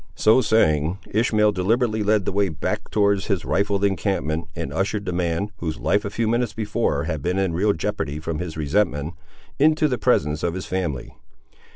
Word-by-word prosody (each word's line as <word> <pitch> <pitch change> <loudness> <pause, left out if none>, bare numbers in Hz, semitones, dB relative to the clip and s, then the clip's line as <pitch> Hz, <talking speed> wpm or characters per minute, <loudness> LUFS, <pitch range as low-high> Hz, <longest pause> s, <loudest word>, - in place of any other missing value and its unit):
So 110 +4 +4
saying, 85 - +2
Ishmael 105 -1 +3
deliberately 110 +4 +1
led 105 -1 +2
the - - -1
way 100 0 +1
back 80 -1 -3
towards 100 -1 +1
his 95 -6 -1
rifled 100 0 0
encampment, 80 -4 -1
and 70 - -4
ushered 100 +3 -1
the 90 - -2
man, 85 +3 -1
whose 80 -5 -4
life 105 0 +1
a 100 - -3
few 115 +2 -1
minutes 120 0 0
before 105 -9 -1
had 80 -2 -3
been 90 +5 -1
in 95 -3 0
real 100 +5 +2
jeopardy 75 -3 -3
from 80 0 -4
his 80 -2 -5
resentment, 75 -1 0 0.5
into 155 +1 +4
the 125 -4 -2
presence 75 - +1
of 85 0 -1
his 95 - -5
family. 85 -9 -3
95 Hz, 185 wpm, -23 LUFS, 80-105 Hz, 0.5 s, So